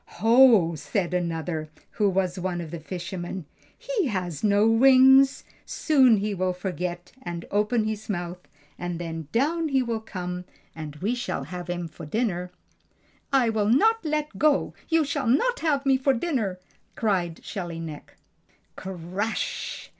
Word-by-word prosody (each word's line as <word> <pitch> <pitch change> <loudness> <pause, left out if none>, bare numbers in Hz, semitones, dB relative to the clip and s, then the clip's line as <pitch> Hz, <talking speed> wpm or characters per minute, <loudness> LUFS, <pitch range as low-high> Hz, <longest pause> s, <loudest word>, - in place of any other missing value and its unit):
"Ho!" 225 -7 +6
said 175 +4 -2
another, 165 -2 -2 0.2
who 210 -2 +1
was 185 -1 0
one 180 -1 -2
of 165 -3 -6
the 170 - -5
fishermen. 175 +1 -6 0.3
"He - - -1
has 180 - -3
no 205 0 +4
wings; 265 +3 +6 0.2
soon 260 -8 +4
he 205 +1 -1
will 185 -1 0
forget 180 -1 -4
and 175 -6 -6
open 210 +3 +2
his 215 0 -4
mouth, 175 -2 -3 0.4
and 175 -1 -3
then 165 -2 -5
down 315 +7 +1
he 265 -2 +2
will 230 -2 -2
come 180 -4 -6 0.3
and 155 -2 -7
we 200 +10 -1
shall 190 - -3
have 175 +4 -7
him 175 -1 -3
for 155 -1 -10
dinner." 180 -3 -1 0.8
"I 255 -4 +3
will 215 -2 +1
not 445 - +4
let 300 - -2
go! 300 -1 +2 0.2
You 325 -2 +3
shall 280 -3 -2
not - - +2
have 285 -4 0
me 270 -1 +4
for 265 +1 +2
dinner!" 230 - -1 0.4
cried 180 -7 -1
Shelly 175 -4 -5
Neck. 160 -3 -8 0.6
Crash! 190 +4 -4
200 Hz, 150 wpm, -25 LUFS, 175-255 Hz, 0.8 s, Ho